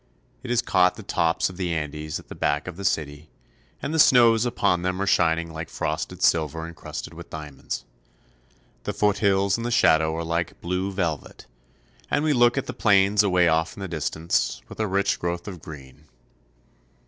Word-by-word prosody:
It 130 - -8
has 120 0 +2
caught 90 0 +3
the - - -10
tops 80 0 +1
of 90 - -9
the 90 -3 -2
Andes 75 -1 -3
at - - -16
the - - -8
back 75 +2 -1
of 90 - -6
the 100 - -8
city, 75 -4 -2 0.5
and 140 - -2
the 160 - 0
snows 120 -4 +6
upon 100 -7 +1
them 90 +1 -2
are 100 - 0
shining 85 -3 +2
like 80 0 -6
frosted 80 +3 -3
silver 80 0 +1
incrusted 85 -1 -8
with - - -11
diamonds. 75 -3 -6 1.0
The - - -2
foothills 100 -1 +2
in - - -4
the 120 - -2
shadow 80 -9 +3
are 85 - -3
like 85 0 -2
blue 90 +3 -2
velvet, 85 -6 -3 0.6
and 145 - +1
we 155 -1 +2
look 120 0 +4
at 135 - -1
the 125 - -5
plains 100 -3 +4
away 90 -4 +3
off 80 +1 +1
in - - -8
the 95 - -3
distance, 80 0 -1
with - - -12
their 110 - +1
rich 100 +1 0
growth 85 +1 -3
of 90 -5 -7
green. 70 -5 -11
SANTIAGO. - - -33
90 Hz, 190 wpm, -24 LUFS, 80-100 Hz, 1.0 s, snows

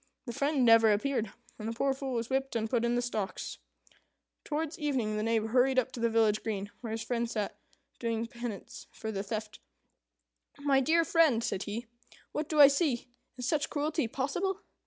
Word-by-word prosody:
The 240 - -5
friend 280 0 +1
never 225 -1 +7
appeared; 225 +2 0 0.3
and 215 - -4
the 230 - -2
poor 270 +4 +1
Fool 270 -1 -4
was 230 -1 -1
whipped 270 0 -1
and 225 -1 0
put 235 +1 +1
in 235 0 +2
the 245 - +1
stocks. 215 -5 -4 0.8
Towards 315 +2 -3
evening 260 -8 0
the 210 - -1
Knave 225 0 +1
hurried 260 +2 +3
up 255 0 +2
to 245 - -7
the 230 0 +2
village 220 -2 +3
green, 205 -2 -3
where 235 - -5
his 220 0 -3
friend 235 0 -1
sat 210 -3 -3 0.4
doing 230 -1 -1
penance 235 -3 -7
for 220 - -5
the 195 -2 -2
theft. 215 +1 -5 1.0
"My 285 -1 +3
dear 325 +5 +3
friend," 310 -10 +4
said 215 -5 -1
he, 225 +4 -4 0.5
"what 300 0 -3
do 305 - 0
I 285 - +12
see? 280 -4 0 0.3
Is 250 -1 -3
such 305 +1 +1
cruelty 300 -2 0
possible? 355 - -2
240 Hz, 190 wpm, -31 LUFS, 225-280 Hz, 1.0 s, I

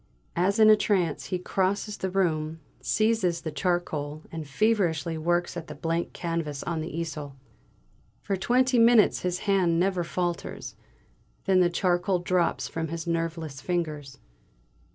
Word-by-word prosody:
As 190 +4 +2
in 215 -1 +7
a - - +8
trance 185 -7 0
he 185 - -2
crosses 195 +3 -1
the 190 - -2
room, 165 -4 0 0.2
seizes 215 -6 +1
charcoal, 155 -4 -2
and 160 -2 -6
feverishly 170 -2 +1
works 175 +2 0
at 165 - -6
the 150 - -8
blank 165 +3 -2
canvas 165 -5 -3
on 165 -1 -2
the 160 - -4
easel. 155 -4 -5 0.9
For 200 - -1
twenty 250 +6 +2
minutes 230 -2 +5
his 180 0 -2
hand 185 -5 +2
never 185 -1 +1
falters, 175 0 -3 0.7
then 190 -2 +4
the 180 -1 +4
charcoal 180 +1 +1
drops 175 -1 0
from 165 0 -3
his 165 +2 -5
nerveless 165 -4 -3
fingers! 155 -5 -3
175 Hz, 140 wpm, -27 LUFS, 160-190 Hz, 0.9 s, a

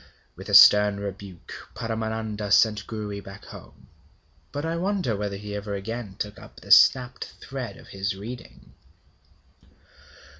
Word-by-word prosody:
With - - -10
a - - +3
stern 105 -1 +8
rebuke, 100 -3 -8 0.2
Paramananda 110 -2 -4
sent 105 -2 +3
Gouri 105 -2 -5
back 95 0 -12
home. - - -13 0.7
But 145 +2 -4
I 165 +1 -2
wonder 180 - -1
whether 100 -1 -4
he 105 +1 -8
ever 105 0 -4
again 105 0 -6
took 105 -1 -5
up - - -14
the - - -9
snapped 125 -1 +5
thread 135 -3 -7
of - - -16
his 95 0 -3
reading. 100 - -10
105 Hz, 140 wpm, -25 LUFS, 100-115 Hz, 0.7 s, stern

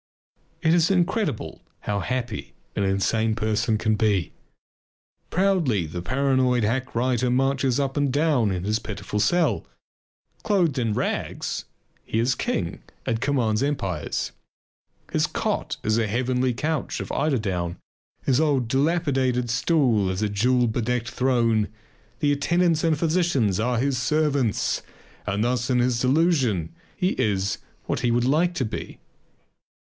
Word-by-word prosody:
It 160 -1 +4
is 170 0 +4
incredible 175 - 0 0.2
how 105 -1 -1
happy 120 -1 -4 0.2
an - - 0
insane 110 +3 +1
person 110 0 0
can 110 0 +1
be. 105 -5 +1 1.0
Proudly 170 - +2
the 85 +3 -5
paranoid 130 +1 +2
hack 125 +5 -1
writer 125 +1 +1
marches 135 0 +1
up 135 -1 -1
and 145 -2 +2
down 145 -6 +2
in 90 -2 -2
his 105 +3 0
pitiful 105 -1 -4
cell. 175 +9 +2 0.8
Clothed 180 - +1
in 115 -3 0
rags, - - -2 0.4
he - - -3
is 120 +3 +2
king 85 -7 -2 0.2
and 115 0 -1
commands 125 -5 +1
empires. 100 - -2 0.8
His - - +2
cot - - -2
is 110 +1 +2
a 110 - +1
heavenly 125 +2 0
couch 155 +1 -2
of - - -5
eiderdown; 95 - -1 0.5
his 135 -1 +2
old 140 -6 +2
dilapidated 135 -4 +1
stool 125 - +2
is 95 +3 -2
a 105 - +1
jewel 125 +5 +2
bedecked 120 0 -1
throne. 115 -4 +2 0.5
The 145 - +3
attendants 165 +3 +2
and 165 -1 +3
the - - -1
physicians 155 - +1
are 120 +2 +1
his 130 +1 0
servants. 145 -6 +1 0.5
And 100 +2 0
thus 125 +1 0
in 125 - +3
his 120 -1 +2
delusion 130 - +2 0.2
he 185 -2 +2
is 100 -2 0 0.3
what - - -1
he 120 - +1
would 120 +1 +2
like 165 +6 +2
to 130 - 0
be. 110 - -6
125 Hz, 140 wpm, -24 LUFS, 110-145 Hz, 1.0 s, It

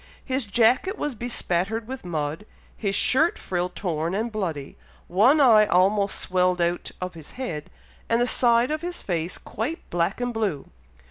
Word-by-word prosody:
His 260 -1 -1
jacket 240 - +2
was 295 - -2
bespattered 220 -2 -2
with 265 +1 -6
mud, 160 +2 -3 0.3
his 200 -3 -2
shirt 310 - +3
frill 180 -1 -2
torn 170 -2 -2
and 225 +3 -2
bloody, 165 -10 -4 0.3
one 230 - +4
eye 220 -6 +6
almost 200 +2 +2
swelled 180 -1 +1
out 175 0 0
of 185 0 -4
his 160 -3 -11
head, 165 - -5 0.4
and 230 - +3
the 240 - +3
side 240 +1 +3
of 310 0 -2
his 350 0 -5
face 170 -1 -2
quite 245 +10 -5
black 175 +5 0
and 245 -1 -2
blue. 200 -11 -2
205 Hz, 160 wpm, -25 LUFS, 175-245 Hz, 0.4 s, eye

